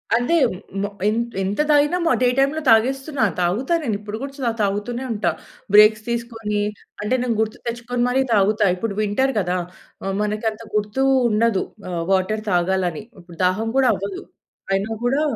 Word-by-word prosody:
అదే, 245 +8 +1 0.5
ము 200 - 0 0.2
ఎం 215 - +2 0.3
ఎంత 195 +2 -2
తాగినా 295 +4 +4 0.2
డే 250 - +4
టైమ్‌లో 280 +3 +2
తాగేస్తున్నా. 265 +4 +2 0.2
తాగుతా. 195 - 0
నేను 225 -7 -1
ఇప్పుడు 210 0 -6
కూడా 270 -3 -2
తాగుతూనే 210 +5 -1
ఉంటా. 215 -2 0 0.4
బ్రేక్స్ 215 0 +7
తీసుకొని, 225 -3 -2 0.4
అంటే 210 +4 -1
నేను 240 -2 0
గుర్తు 220 0 -2
తెచ్చుకొని 240 +1 -2
మరి 260 +2 +2
తాగుతా. 210 +1 +3
ఇప్పుడు 200 +2 -3
వింటర్ 240 +6 +1
కదా! 180 -1 0 0.5
ఆహ్, 195 0 -2
మనకు 210 +1 -1
అంత 215 - -12
గుర్తు 210 +5 0 0.3
ఉండదు. 220 -2 +2 0.3
ఆహ్, 170 -1 -2
వాటర్ 195 +3 +1
తాగాలని 180 -1 0 0.2
ఇప్పుడు 175 -1 -15
దాహం 210 +5 0
కూడా 265 -2 +4
అవ్వదు. 195 0 -5 0.5
అయినా 195 +3 -1
కూడా 270 +4 +2
215 Hz, 150 wpm, -21 LUFS, 200-245 Hz, 0.5 s, బ్రేక్స్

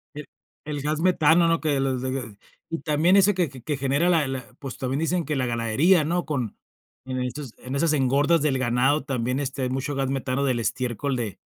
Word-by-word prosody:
E 150 -1 -7 0.4
el 145 -2 -4
gas 150 +2 -1
metano, 170 -2 +4
¿no? 165 0 +2
Que 145 -4 0
los 130 -2 0
de 130 -5 -4 0.3
y 165 - -3
también 160 +5 +2
ese 200 +1 +5
que 175 -5 0
que 135 +2 -5
genera 140 +6 +1
la 160 -6 +3
la, 130 -2 -4
pues, 135 -2 -7
también 130 +2 -2
dicen 170 +1 0
que 150 - -2
la 130 -1 0
ganadería, 120 +9 +3
¿no? 175 +3 -1
Con 130 -9 -3 0.5
en 130 -1 -3
est 125 +2 -4 0.2
esas 140 +5 0
engordas 140 +4 +3
del 140 -3 +1
ganado 130 +4 +2
también, 125 -1 -1
este, 135 -1 -3
hay 125 - 0
mucho 135 +3 -2
gas 135 -1 -1
metano 135 0 -1
del 125 -3 +1
estiércol 125 +3 -2
de, 110 -5 -4
140 Hz, 205 wpm, -25 LUFS, 130-155 Hz, 0.5 s, ese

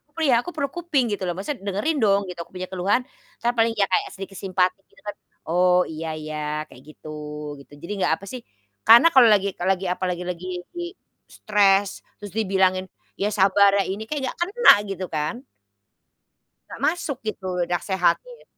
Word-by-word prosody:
Aku 295 - -43
perlu 325 0 -1
ya - - +6
aku - - -5
perlu 280 -2 -1
kuping, 330 -7 +1
gitu 205 - -3
loh. 175 - -1
Maksudnya 200 +3 -5
dengerin 210 +11 -1
dong 200 -1 +4
gitu, 180 -1 -8
aku - - -28
punya 185 0 -5
keluhan. 190 +6 +1 0.4
Entar 240 +1 +1
paling 225 0 +3
ya 205 -3 +1
kayak 185 - +1
sedikit 195 0 -8
simpati 185 0 0
gitu - - -23
kan, 205 -1 -5 0.3
"Oh, 180 +2 +3
iya 160 +1 -5
iya. 155 0 -6 0.3
Kayak 125 - -16
gitu-" 150 -1 -8
gitu. 140 - -18
Jadi 170 - -6
nggak - - +2
apa 195 - -11
sih, 255 - -6 0.5
karena 235 +8 +9
kalau 255 -3 +8
lagi 200 -1 +3
kalau 180 +2 -1
lagi 190 +1 -6
apa 180 +1 -2
lagi 180 0 -4
lagi 180 +1 -6 0.8
stres, 200 -1 +2 0.2
terus 205 -3 -8
dibilangin, 190 -3 +2 0.4
"Ya 200 - +1
sabar 200 0 +5
ya." - - +3
Ini 200 +3 -4
kayak 300 -1 -2
nggak - - -7
kena 400 +8 +6 0.2
gitu 190 -1 -4
kan? 155 +2 -2 1.3
Nggak - - -10
masuk 315 -5 -1
gitu, 200 -3 -4 0.2
nasehatin. 190 - -1
195 Hz, 185 wpm, -23 LUFS, 180-225 Hz, 1.3 s, karena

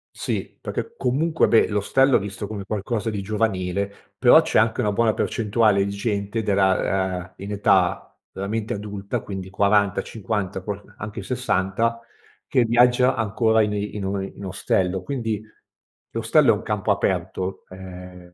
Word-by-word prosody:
Sì, - - -4
perché 460 - -5
comunque 160 +5 +1
beh, 115 - +4
l'ostello 125 +6 +3
è - - -1
visto 100 +1 -5
come 105 -2 -5
qualcosa 110 +2 -2
di 100 - -3
giovanile, 100 -2 -2
però - - +7
c'è - - 0
anche 115 +2 +3
una 105 -3 +1
buona 110 +1 +2
percentuale 105 -3 +2
di 100 - -3
gente 100 +1 -2
della, 95 -2 +1
ah, 90 - -17
in 100 +1 -7
età 95 -3 +2 0.3
veramente 105 +3 -3
adulta, 100 -1 -4
quindi 95 -2 -6
40-50, 100 0 0
qualc 100 0 -7
anche 105 0 -6
60 115 -1 0 0.5
che 125 - +3
viaggia 125 +2 +4
ancora 110 0 +2
in 105 -1 +1
in 105 -1 -3
o 95 0 -1
in 95 +1 -8
ostello, 95 0 0
quindi 115 -4 -2 0.7
l'ostello - - +4
è - - 0
un - - -9
campo 105 0 -1
aperto, 95 -1 -2
ehm 90 -1 -11
100 Hz, 145 wpm, -23 LUFS, 95-110 Hz, 0.7 s, però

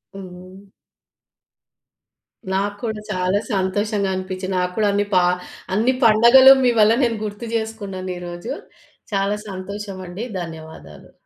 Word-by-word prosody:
హ్మ్. 185 +1 -11 1.9
నాకు 200 +1 -1
కూడా 220 -2 -3
చాలా 185 +1 0
సంతోషంగా 200 +1 0
అనిపిచ్చి 185 0 -5
నాకు 180 0 0
కూడా 210 -1 +2
అన్ని 205 0 +1
ప - - +3 0.6
అన్ని 240 +5 +2
పండగలు 235 +4 +8
మీ 245 - +4
వల్ల 215 +2 +5
నేను 230 -2 +1
గుర్తు 210 +2 -6
జేసుకున్నాను 200 -5 -4
ఈ - - -8
రోజు. 175 +8 -7 0.6
చాలా 200 +1 +1
సంతోషమండి 195 +1 -6 0.2
ధన్యవాదాలు. 160 -1 -10
200 Hz, 115 wpm, -21 LUFS, 185-215 Hz, 1.9 s, పండగలు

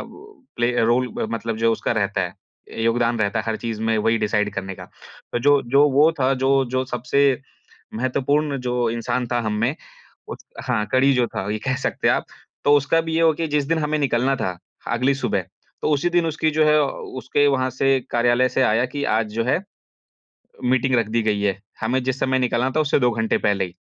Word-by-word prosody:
वो 415 -8 -15
play 120 +1 +1
role 125 +2 +2 0.2
मतलब 115 -1 -3
जो 115 0 +2
उसका 115 - -1
रहता 100 -3 -1
है, 90 -2 -3 0.5
योगदान 120 0 +1
रहता 100 -2 0
है - - -2
हर 110 -1 -1
चीज़ 115 -2 -5
में 110 0 +1
वही 115 +2 +2
डिसाइड 105 -1 0
करने 95 -1 -4
का। - - -11 0.5
जो 145 +1 +4
जो 140 +2 +5
वो 145 +4 +5
था 130 +1 +3
जो 135 0 +3
जो 130 0 0
सबसे 130 +2 +1 0.5
महत्वपूर्ण 140 +4 0
जो 125 -1 0
इंसान 120 +2 -2
था 120 - +1
हम 110 -2 -2
में 130 +6 +1 0.5
उस - - -9 0.2
हाँ 115 -5 0
कड़ी 135 +2 +4
जो 125 -2 +1
था 100 - -3
ये 110 - -2
कह 130 - +1
सकते - - -1
हैं - - +5
आप, - - -3 0.4
तो 145 - +4
उसका 145 +4 +1
भी 160 0 -4
ये 165 - +2
हो 160 -1 +5
गया 165 +2 -3
कि - - -11
जिस 145 -2 +1
दिन 165 +1 +1
हमें 155 0 0
निकलना 135 -1 +1
था 90 -8 -3 0.3
अगली 125 +4 +1
सुबह, 135 - -1 0.4
तो - - 0
उसी 150 +4 +1
दिन 175 -1 +2
उसकी 155 0 0
जो 155 0 +2
है 150 0 +4 0.4
उसके 145 +3 +2
वहाँ 130 -2 +1
से 135 +1 +2
कार्यालय 120 +2 +2
से 130 - 0
आया 115 +2 +2
कि 140 +3 -5
आज 110 -1 -1
जो 115 0 0
है, 130 +8 +1 1.1
मीटिंग 130 +1 +2
रख 115 -2 +1
दी 115 +1 0
गयी 105 -2 0
है। 100 -1 0 0.2
हमें 125 +3 0
जिस 130 0 -2
समय 130 0 +1
निकलना 125 0 0
था 155 - +4
उससे 150 - +2
2 125 -1 +3
घंटे 110 -1 0
पहले 100 -2 +1
ही। 90 -1 -9
125 Hz, 215 wpm, -22 LUFS, 115-140 Hz, 1.1 s, जो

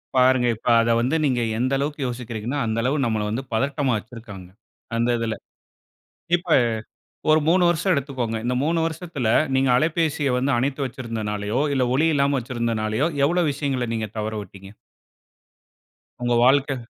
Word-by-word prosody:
பாருங்க, 130 -1 +4
இப்ப 110 - -12
அத 115 - 0
வந்து 130 +6 0
நீங்க 125 -4 +1 0.2
எந்த 130 +2 0
அளவுக்கு 145 +2 -3
யோசிக்கிறீங்கன்னா, 120 +2 -4
அந்த 110 0 -2
அளவு 135 +5 +1
நம்பள 110 -2 -1
வந்து 125 +4 -3
பதட்டமா 135 +2 0
வெச்சுருக்காங்க! 105 -4 -10 0.5
அந்த 120 +1 +1
இதில. 115 -1 -2 1.0
இப்ப, 175 0 -6 0.8
ஒரு 155 0 +6
3 180 +1 +4
வருஷம் 175 +3 +1
எடுத்துக்கோங்க. 130 -5 -2
இந்த 125 +1 0
3 165 +2 +1
வருஷத்தில 165 -6 -3 0.3
நீங்க 135 0 +2
அலைபேசிய 155 -1 0
வந்து 135 +3 0
அணைத்து 135 +3 -1
வைத்திருந்தனாலயோ, 110 -3 -3
இல்ல 130 -2 +2
ஒலி 155 +4 +3
இல்லாமல 140 -1 +2
வச்சிருந்தனாலயோ, 115 +1 -1 0.2
எவ்ளோ 175 +4 +2
விஷயங்கள 135 -3 -2
நீங்க 110 -1 -3
தவற 110 +1 -3
விட்டீங்க? 95 0 -13 1.5
உங்க 120 0 +1
வாழ்க்க 135 +2 +3
130 Hz, 140 wpm, -23 LUFS, 115-140 Hz, 1.5 s, ஒரு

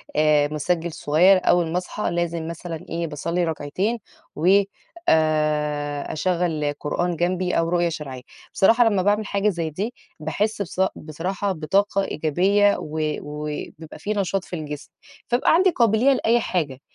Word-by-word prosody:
آآ، 150 -1 +4
مُسجّل 165 +3 -1
صغيّر 175 +7 +4
أوّل 175 -2 +2
ما 175 - 0
أصحى 180 +1 -3
لازم 170 -1 -2
مثلًا 170 -1 -6
إيه 170 0 -2
باصلّي 165 +4 -2
ركعتين 165 +8 -2 0.4
و 160 +4 -1 0.6
آآ، 150 -2 +1
أشغّل 160 -3 0
قرآن 175 +4 -1
جنبي 180 +2 0
أو 165 0 +1
رقية 175 -1 +2
شرعية، 140 -5 -6 0.3
بصراحة 230 +5 +5
لمّا 200 -3 +1
باعمِل 205 +2 +1
حاجة 200 +1 +1
زي 170 -4 -2
دي 205 +10 -4 0.3
باحس 205 +8 -1
بصا 190 0 0
بصراحة 185 +6 -3
بطاقة 195 +4 +1
إيجابية، 195 +7 +2
و 155 +1 -5 0.2
وبيبقى 150 +1 -7
في 210 - -2
نشاط 195 -1 -1
في 180 - -7
الجسم، 150 -2 -6 0.4
فابقى 240 +1 +3
عندي 370 +3 +5
قابلية 240 - +3
لأي 240 -1 +2
حاجة، 155 - -2
170 Hz, 145 wpm, -23 LUFS, 155-195 Hz, 0.6 s, بصراحة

